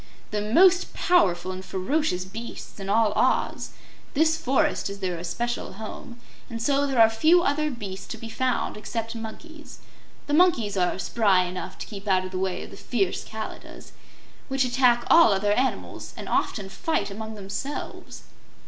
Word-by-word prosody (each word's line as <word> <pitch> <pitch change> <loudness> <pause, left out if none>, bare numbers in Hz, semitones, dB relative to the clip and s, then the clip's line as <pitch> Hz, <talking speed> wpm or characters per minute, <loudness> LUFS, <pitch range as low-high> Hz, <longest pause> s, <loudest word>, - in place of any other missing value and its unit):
"The 210 0 -1
most 355 - +4
powerful 185 - +2
and 185 0 -6
ferocious 190 - -1
beasts 225 +3 -8
in 195 0 -5
all 215 0 +3
Oz. - - +1 0.5
This 315 +2 +4
forest 265 -8 +1
is 200 - -6
their 180 -3 -3
especial 235 +9 -3
home, 220 +3 -8 0.3
and 230 -2 -5
so 280 +4 +2
there 265 -3 0
are 225 - +9
few 315 +11 +4
other 305 0 +1
beasts 200 -7 -7
to - - -6
be 230 - -8
found 255 +1 -1
except 225 +1 -4
monkeys. 300 +8 -9 0.5
The 290 - -3
monkeys 295 - +3
are 180 -1 +1
spry 190 -1 +2
enough 180 0 -6
to - - -6
keep 200 -1 -9
out 185 -1 +2
of 185 - -7
the 185 - -3
way 190 -1 -2
of - - -11
the - - -11
fierce 195 -7 -1
Kalidahs, 220 0 -8 0.6
which 270 -1 +1
attack 245 -1 +3
all 330 -10 +7
other 205 +1 +2
animals 260 +4 -2
and - - -7
often 200 -4 -1
fight 200 0 -2
among 220 +2 -6
themselves." 205 +8 -6
220 Hz, 165 wpm, -25 LUFS, 195-270 Hz, 0.6 s, are